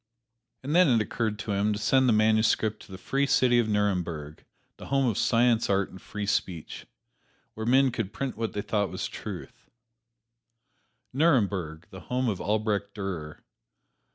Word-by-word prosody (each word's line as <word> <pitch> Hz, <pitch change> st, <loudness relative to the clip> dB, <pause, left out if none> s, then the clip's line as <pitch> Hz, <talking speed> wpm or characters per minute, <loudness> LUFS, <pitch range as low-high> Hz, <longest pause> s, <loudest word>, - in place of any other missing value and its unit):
And 145 Hz, +4 st, -2 dB
then 180 Hz, 0 st, +6 dB
it 120 Hz, -3 st, +4 dB
occurred 110 Hz, 0 st, -2 dB
to 105 Hz, +1 st, -5 dB
him 100 Hz, +1 st, +1 dB
to -, -, -3 dB
send 130 Hz, +4 st, +3 dB
the -, -, +4 dB
manuscript 110 Hz, 0 st, +2 dB
to -, -, -15 dB
the 95 Hz, -, -7 dB
free 140 Hz, +8 st, -1 dB
city 125 Hz, -2 st, +4 dB
of 115 Hz, -2 st, +1 dB
Nuremberg, 90 Hz, -7 st, -2 dB, 0.3 s
the -, -, -10 dB
home 135 Hz, 0 st, +2 dB
of 115 Hz, -5 st, +1 dB
science, 115 Hz, +1 st, +2 dB
art 100 Hz, -1 st, +1 dB
and 95 Hz, -, -12 dB
free 105 Hz, -1 st, -5 dB
speech, 95 Hz, -6 st, -3 dB, 0.7 s
where 110 Hz, +1 st, -5 dB
men 130 Hz, +1 st, +4 dB
could 115 Hz, -5 st, -3 dB
print 130 Hz, +5 st, -4 dB
what 115 Hz, 0 st, -3 dB
they 105 Hz, -, -3 dB
thought 105 Hz, -3 st, 0 dB
was 95 Hz, -, -4 dB
truth -, -, -9 dB, 1.4 s
Nuremberg, 100 Hz, -, +1 dB
the 95 Hz, -, -9 dB
home 125 Hz, +6 st, -1 dB
of 100 Hz, -, -3 dB
Albrecht 105 Hz, -1 st, -1 dB
Durer. 90 Hz, -7 st, -6 dB
110 Hz, 165 wpm, -27 LUFS, 100-120 Hz, 1.4 s, then